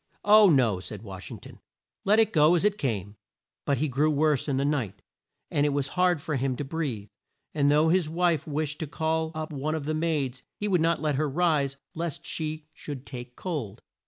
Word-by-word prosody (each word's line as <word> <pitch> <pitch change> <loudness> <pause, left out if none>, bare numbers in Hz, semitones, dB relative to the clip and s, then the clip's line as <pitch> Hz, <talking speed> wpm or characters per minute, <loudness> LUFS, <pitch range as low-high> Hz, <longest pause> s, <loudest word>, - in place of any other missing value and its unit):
"Oh, 210 -1 +8
no," 120 - +3
said 105 +3 -8
Wash 95 -4 -8
ing - - -7
ton. - - -13 0.5
"Let 210 +2 +5
it 225 -1 +3
go 155 +2 +5
as 175 - +1
it 210 0 +1
came." 105 -5 -2 0.5
But 140 - +1
he 155 +5 0
grew 145 +3 +2
worse 150 -2 +2
in 140 -2 0
the 140 - +1
night, 115 -10 -2 0.5
and 145 - +2
it 150 - +3
was 140 -1 -1
hard 180 -2 +2
for 145 0 -2
him 130 0 0
to 145 - -4
breathe, 135 -9 -3 0.4
and 145 -2 +2
though 150 +2 +4
his 175 -2 +2
wife 170 -1 +1
wished 150 0 -2
to 160 - -3
call 160 +1 -1
up 155 0 -4
one 150 +3 -2
of 155 -3 -4
the 155 - -1
maids 150 -6 -1 0.2
he 210 - -2
would 180 -5 +2
not 165 0 +1
let 150 -3 +1
her 155 0 +1
rise 145 -3 +1 0.2
lest 165 -2 -4
she 155 -1 -3
should 140 -3 -8
take 125 -1 -8
cold. 150 - -5
150 Hz, 215 wpm, -27 LUFS, 135-160 Hz, 0.5 s, Oh